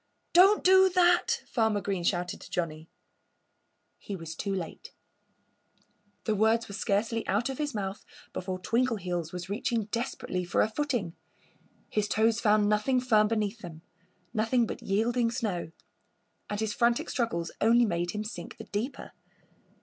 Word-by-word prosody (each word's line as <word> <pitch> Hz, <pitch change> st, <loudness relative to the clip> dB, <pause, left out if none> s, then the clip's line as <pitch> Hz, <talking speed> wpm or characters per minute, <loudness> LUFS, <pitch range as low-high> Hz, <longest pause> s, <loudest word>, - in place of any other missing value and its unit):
"Don't 390 Hz, +4 st, +6 dB
do 380 Hz, 0 st, +7 dB
that!" 365 Hz, +6 st, +3 dB
Farmer 220 Hz, -3 st, +1 dB
Green 195 Hz, -3 st, -2 dB
shouted 175 Hz, 0 st, -1 dB
to -, -, -11 dB
Johnnie. 160 Hz, -2 st, -3 dB, 1.1 s
He 200 Hz, -, -6 dB
was 165 Hz, -3 st, -7 dB
too 200 Hz, +5 st, -4 dB
late. 185 Hz, -4 st, -5 dB, 1.3 s
The 220 Hz, -, 0 dB
words 220 Hz, +2 st, +2 dB
were 200 Hz, -, -9 dB
scarcely 220 Hz, +2 st, -1 dB
out 215 Hz, +7 st, +1 dB
of 270 Hz, -, -5 dB
his 295 Hz, -5 st, -2 dB
mouth 195 Hz, -1 st, -4 dB, 0.3 s
before 185 Hz, 0 st, -3 dB
Twinkleheels 185 Hz, -6 st, -1 dB
was 180 Hz, 0 st, -6 dB
reaching 215 Hz, +2 st, -1 dB
desperately 230 Hz, -6 st, -2 dB
for 175 Hz, -, +1 dB
a -, -, +1 dB
footing. 235 Hz, -, -2 dB, 0.7 s
His 210 Hz, -1 st, -1 dB
toes 220 Hz, +2 st, +2 dB
found 210 Hz, -1 st, +4 dB
nothing 215 Hz, +5 st, +2 dB
firm 220 Hz, -4 st, +3 dB
beneath 215 Hz, 0 st, -1 dB
them 165 Hz, -5 st, -10 dB, 0.5 s
nothing 225 Hz, +2 st, +2 dB
but -, -, -6 dB
yielding 230 Hz, +4 st, +1 dB
snow. 215 Hz, -9 st, -2 dB, 0.8 s
And 205 Hz, -, -3 dB
his 220 Hz, -1 st, -1 dB
frantic 235 Hz, -1 st, +2 dB
struggles 225 Hz, -9 st, -2 dB
only 235 Hz, +2 st, +5 dB
made 175 Hz, -4 st, -1 dB
him 210 Hz, +3 st, -3 dB
sink 215 Hz, +3 st, -8 dB
the 225 Hz, -, -8 dB
deeper. 220 Hz, +6 st, -4 dB
215 Hz, 150 wpm, -29 LUFS, 190-235 Hz, 1.3 s, do